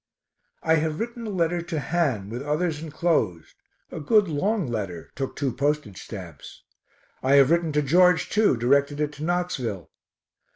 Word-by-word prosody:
I 160 0 +3
have 155 0 -1
written 235 0 -4
a - - -3
letter 175 -3 0
to 165 -2 -4
Han, 135 - -1
with 120 +2 -4
others 150 +2 -1
enclosed, 150 - -1 0.4
a - - -6
good 210 +6 +3
long 190 +6 0
letter 100 -9 -5
(took 135 -1 -4
two 140 -3 -1
postage 140 -8 -2
stamps). 90 -8 -10 0.6
I 135 +2 +3
have 140 +1 +6
written 170 -1 +2
to 150 0 +2
George 180 +3 +4
too, 210 - +3
directed 140 +4 +2
it 150 -1 0
to 150 0 -9
Knoxville. 155 - -2
150 Hz, 160 wpm, -25 LUFS, 130-175 Hz, 0.6 s, have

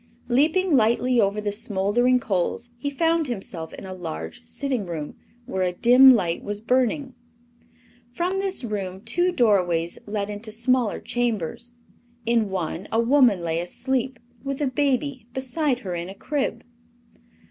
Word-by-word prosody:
Leaping 315 +7 +3
lightly 240 +1 +3
over 200 +1 +1
the 210 -1 -2
smoldering 210 +5 +1
coals 220 +3 -2
he 285 - -2
found 325 +2 +1
himself 190 -8 -5
in - - -9
a 190 - -6
large 80 - -6
sitting 255 - -2
room, 155 -4 -5 0.3
where 190 - -3
a 180 -1 +1
dim 250 +6 +7
light 175 -6 -1
was 205 0 -3
burning. 255 +3 0 1.0
From 360 +8 -1
this 385 -6 -2
room 195 -4 -4
two 350 - +1
doorways 180 - +2
led 205 -1 -2
into 210 +2 -7
smaller 235 0 +1
chambers. 235 0 -2 0.5
In 230 -3 +2
one 180 -1 -3
a 225 - +2
woman 235 -5 +4
lay 165 0 -1
asleep, 255 +8 -2 0.3
with 275 -1 -3
a 295 - +1
baby 270 -2 0
beside 265 +1 0
her 180 - -3
in 170 +1 -4
a 195 - -9
crib. 285 +5 -2
235 Hz, 145 wpm, -24 LUFS, 190-265 Hz, 1.0 s, dim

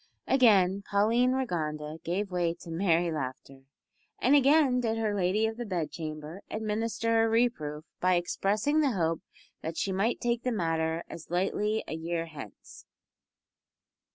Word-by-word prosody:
Again 200 -7 +4
Pauline 225 +5 +2
Rigonda 155 -10 -3
gave 190 +4 -2
way 175 -2 0
to 165 - -9
merry 170 -1 +2
laughter, 135 -2 -6 0.5
and 255 - +3
again 280 -2 +5
did 225 -2 0
her 220 -2 0
lady 200 +2 +1
of 220 0 -2
the 240 - -3
bedchamber 160 -3 -5
administer 225 +1 0
a 225 - +2
reproof 165 -11 0
by 185 0 +3
expressing 210 - +1
the 285 -5 +2
hope 165 -4 0 0.4
that 160 +1 -5
she 195 - -1
might 200 +5 0
take 240 -1 0
the 250 - -1
matter 165 -4 -1
as 165 - -10
lightly 205 +5 0
a - - -4
year 165 +1 -2
hence. 145 - -11
190 Hz, 145 wpm, -29 LUFS, 165-225 Hz, 0.5 s, again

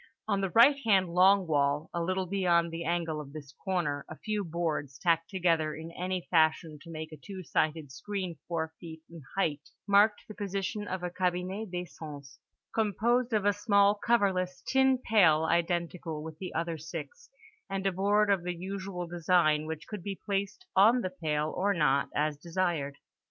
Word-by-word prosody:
On 200 -2 +1
the 195 - 0
right 235 - +6
hand 195 -5 +3
long 190 +2 +5
wall, 145 -1 +1
a 170 - -1
little 185 +2 -1
beyond 175 -3 +2
the 165 +1 -5
angle 165 -2 -1
of 140 -1 -11
this 145 -3 -9
corner, 170 -7 -1
a 155 - -8
few 210 -1 -2
boards, 160 -5 -3
tacked 165 +1 +1
together 165 -5 +1
in 160 +1 -8
any 180 +1 -3
fashion 160 -2 +2
to 165 - -13
make 160 -1 -6
a 155 - -9
two 190 +5 -9
sided 155 -3 -1
screen 185 +4 -5
four 160 -2 -2
feet 160 -1 -10
in 165 -1 -10 0.2
height, 155 -4 -1 0.2
marked 205 +1 +4
the 215 - -8
position 205 +1 -3
of 185 -1 -4
a 180 - -2
cabinet 185 +3 -2
d'aisance, 155 -6 -8 0.3
composed 230 +3 +1
of 210 -3 +1
a 205 - +4
small 200 -1 +4
coverless 200 -5 0
tin 265 0 +3
pail 180 -11 +4
identical 170 -2 -1
with 160 0 -9
the 185 - -5
other 165 -1 -2
six, 480 - -8 0.4
and 195 0 -3
a 195 - +3
board 205 +3 +2
of 195 -3 +2
the 175 0 -3
usual 190 0 -5
design 170 -3 +2
which 160 -1 -5
could 210 -3 -7
be 195 +1 -5
placed 200 - -2
on 225 +6 +6
the 185 - -3
pail 155 -3 -2
or 200 +2 +1
not 140 -4 +2
as 150 0 0
desired. 165 -5 -2
175 Hz, 180 wpm, -30 LUFS, 160-200 Hz, 0.4 s, right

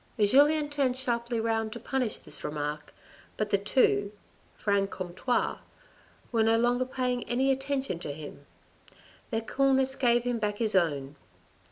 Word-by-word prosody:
Julien 290 +8 +4
turned 270 -3 +1
sharply 235 -2 -1
round 225 -1 0
to 235 - -7
punish 250 -1 -1
this - - -6
remark, 150 0 -4 0.5
but 215 -1 -2
the 200 - +3
two, 205 -1 +2 0.5
Franc 200 -1 +1
comtois, 185 +8 -2 0.7
were 230 -2 +2
no 225 +1 +4
longer 245 +2 +2
paying 250 -1 -2
any 265 +3 +1
attention 270 -7 -2
to 150 - -5
him. 145 -1 -10 0.8
Their 225 -2 -1
coolness 265 +2 +2
gave 240 -3 +2
him 245 -1 -1
back 210 -1 -1
his 220 -1 +1
own. 145 -6 0
235 Hz, 145 wpm, -28 LUFS, 200-260 Hz, 0.8 s, Julien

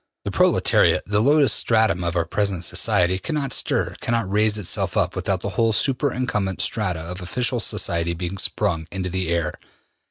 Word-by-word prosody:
The - - -2
proletariat, - - +3
the 105 +1 +1
lowest 145 +3 +4
stratum 110 -6 +2
of 85 0 -2
our 85 -1 +1
present 95 0 -1
society, 95 -1 +1
cannot 145 -3 -3
stir, - - 0
cannot 115 -4 -1
raise 105 +1 +2
itself 100 -5 -2
up, - - 0
without - - -2
the - - -3
whole 115 -1 +1
super 135 +4 +1
incumbent 105 -7 -2
strata 95 -7 -1
of 90 +3 -7
official 120 +7 -1
society 85 -5 -1
being 90 +3 -5
sprung 85 -7 -1
into 95 -2 -4
the 95 -1 -2
air.'' 85 0 -1
100 Hz, 170 wpm, -22 LUFS, 90-115 Hz, -, lowest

